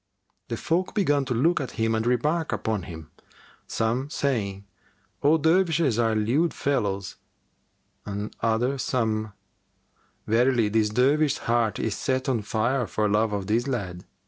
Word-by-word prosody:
The - - -3
folk 180 +5 -1
began 145 -9 +2
to 125 -2 -2
look 165 +9 +2
at 130 - -5
him 115 0 +1
and 110 +1 0
remark 150 +7 +1
upon 110 -2 -1
him, 80 -2 -9 0.6
some 120 +5 -1
saying, 105 - -2 0.6
"All 150 +3 +4
Dervishes 160 - +2
are 115 -1 +2
lewd 130 +10 +1
fellows," 100 -9 -1 0.9
and 100 +1 -5
other 120 +4 +1
some, 110 -4 -1 0.9
"Verily, 120 0 +3
this 110 0 +2
Dervish's 140 +6 +2
heart 115 -2 +1
is 110 - -1
set 130 -1 -1
on 125 -5 +1
fire 120 +4 0
for 105 +4 0
love 105 +1 +2
of 100 -2 -2
this 115 +5 0
lad." 95 -9 -3
120 Hz, 145 wpm, -25 LUFS, 110-140 Hz, 0.9 s, All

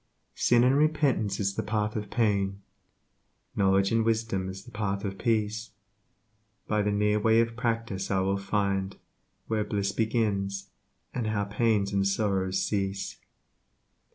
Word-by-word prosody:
Sin 120 0 +3
and 130 +2 +4
repentance 140 -9 +2
is 100 -1 0
the - - -2
path 105 -1 -1
of 105 -1 -4
pain, 100 -4 +1 1.0
Knowledge 95 0 +3
and 115 0 +3
wisdom 110 -4 0
is 95 +1 -8
the - - -14
path 100 -1 -2
of 95 -1 -4
Peace 110 -1 0 1.0
By 105 -1 +1
the 105 - +1
near 105 +1 +2
way 110 +1 +4
of 115 0 +1
practice 115 -5 -2
I 95 -1 +2
will 95 +1 0
find 100 -1 -1 0.5
Where 110 -1 0
bliss 100 -2 -1
begins, 100 -3 -1 0.4
how 110 -4 -1
pains 105 -1 +1
and 100 0 +2
sorrows 95 -2 0
cease. 100 -1 -2
105 Hz, 140 wpm, -28 LUFS, 100-110 Hz, 1.0 s, and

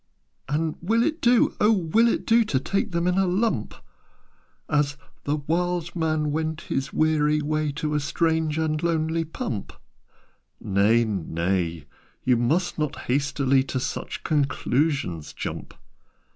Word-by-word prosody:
"And 155 +2 -1
will 225 +6 +2
it 315 +3 -1
do, 240 -1 +4
O 210 - +5
will 210 +3 +3
it - - 0
do 230 0 +5
To 135 -11 0
take 195 +9 -1
them 170 0 -1
in 180 +1 +2
a 190 - +2
lump 180 - 0 0.9
As 145 0 +1 0.3
'the 145 - +1
wild 175 +1 -1
man 155 -2 0
went 160 +1 -2
his 135 +1 -3
weary 150 -1 +2
way 155 0 -1
To 150 +1 -2
a 150 - +2
strange 160 +1 0
and 155 -1 0
lonely 165 -1 0
pump'?" 120 -9 -5 0.9
"Nay, 105 +4 +3
nay! 85 -4 -2 0.4
You 125 - +3
must 155 +10 0
not 150 -2 -2
hastily 135 0 +1
To 130 - -2
such - - -4
conclusions 140 - 0
jump. - - -6
155 Hz, 140 wpm, -25 LUFS, 135-170 Hz, 0.9 s, O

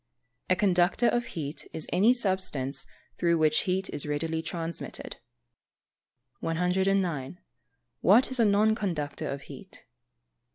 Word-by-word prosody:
_ - - -53 0.5
A - - +6
conductor 185 +4 +2
of 240 0 +1
heat 150 -1 -5
is 160 - -2
any 200 +7 +5
substance 185 - -1 0.3
through 170 -1 +3
which 155 -1 +3
heat 190 +1 0
is 145 - -3
readily 160 +2 -1
transmitted. 165 0 -6 1.2
109. 180 -3 0 0.6
_What 260 - +5
is 260 - -2
a 230 - +5
non 210 +1 +4
conductor 170 -10 -3
of 140 0 -5
heat? 195 -2 -12
180 Hz, 125 wpm, -28 LUFS, 155-195 Hz, 1.2 s, A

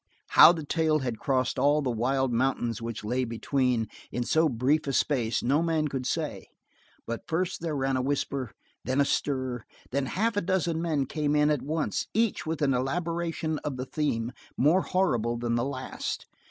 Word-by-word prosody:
How - - +9
the 165 -3 -4
tale 160 0 +2
had 120 -4 -3
crossed 130 -2 0
all 145 +2 +3
the 130 - 0
wild 130 +2 0
mountains 120 -2 0
which 115 -2 -5
lay 125 +4 0
between 125 0 0 0.2
in 120 - -1
so 160 +5 +3
brief 135 +5 +1
a 135 - -1
space 120 -5 +1
no 140 +6 +3
man 160 -2 +1
could 130 -2 -3
say, - - -3 0.6
but 115 0 -5
first 180 +2 -1
there 165 -3 -2
ran 135 -1 0
a 130 - +1
whisper 140 0 -1
and 110 - -15 0.3
then 130 +4 +1
a - - +3
stir, 130 -3 -1
and 115 - -15 0.3
then 140 +1 0
half 220 - 0
a 205 - +1
dozen 170 -3 0
men 155 -5 0
came 150 +1 -1
in 150 0 +4
at 150 - 0
once, 155 +2 -2
each 225 -7 +1
with 160 -1 -1
an 135 -2 +3
elaboration 165 +3 -1
of 140 -3 -4
the 130 - -3
theme 125 -6 -1 0.3
more 155 +8 +4
horrible 120 - 0
than 120 0 -1
the 120 0 +1
last. 130 -1 -4
140 Hz, 195 wpm, -28 LUFS, 125-160 Hz, 0.6 s, How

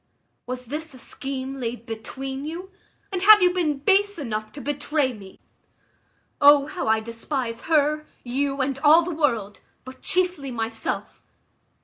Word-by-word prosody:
Was 250 0 -5
this 300 +3 -5
a - - -11
scheme 270 +2 -5
laid 235 -1 -4
between 265 +4 -6
you, 345 +5 -6 0.4
and 370 -2 -2
have 415 0 +8
you 360 0 +4
been 320 -6 0
base 400 +7 +2
enough 215 -7 -4
to 290 - -8
betray 290 -1 -1
me? 195 -4 -13 1.0
O 285 -1 +7
how 330 0 -4
I 220 0 +3
despise 230 +1 -4
her, 305 -1 +2 0.2
you, 275 +2 -1
and 270 0 -1
all 310 +3 +6
the 350 +1 -4
world, 235 -10 0 0.3
but 260 0 -11
chiefly 360 -6 0
myself! 225 -2 -4
275 Hz, 145 wpm, -24 LUFS, 240-310 Hz, 1.0 s, have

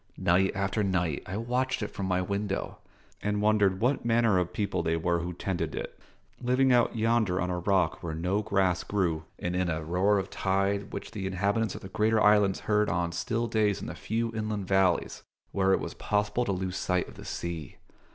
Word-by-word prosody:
Night 95 +3 +3
after 100 +2 0
night 90 -6 0
I 100 0 -4
watched 125 +2 -1
it 105 - -3
from 100 -1 -4
my 90 0 +1
window, 100 +1 -3 0.4
and 105 0 0
wondered 105 -3 +3
what 125 +6 +1
manner 115 -4 +3
of 90 -1 -1
people 100 -4 -1
they 80 0 0
were 85 +1 +1
who 85 +1 -4
tended 90 +1 -3
it, - - -6 0.4
living 130 +1 +3
out 120 -1 +3
yonder 110 -4 +2
on 90 +1 -1
a 90 - -1
rock 90 -2 +1
where 80 -3 -4
no 90 +6 0
grass 95 -4 +1
grew, 85 -6 -1
and 90 0 -3
in 90 -1 +1
a 80 -1 -2
roar 95 +5 +2
of 95 0 -3
tide 100 +1 0
which - - -6
the 100 -4 -4
inhabitants 100 +3 0
of - - -8
the - - -8
greater 110 +3 +2
islands 105 -2 +4
heard 105 0 +2
on 85 0 0
still 115 +6 -1
days 105 -3 +1
in - - -6
the - - -5
few 115 +1 -2
inland 110 -3 -3
valleys 95 -2 +2 0.3
where 95 -1 +2
it - - +4
was - - -5
possible 105 +4 0
to 100 - 0
lose 95 0 -2
sight 90 -1 0
of - - -11
the - - -11
sea. 85 -5 -5
100 Hz, 205 wpm, -28 LUFS, 90-105 Hz, 0.4 s, islands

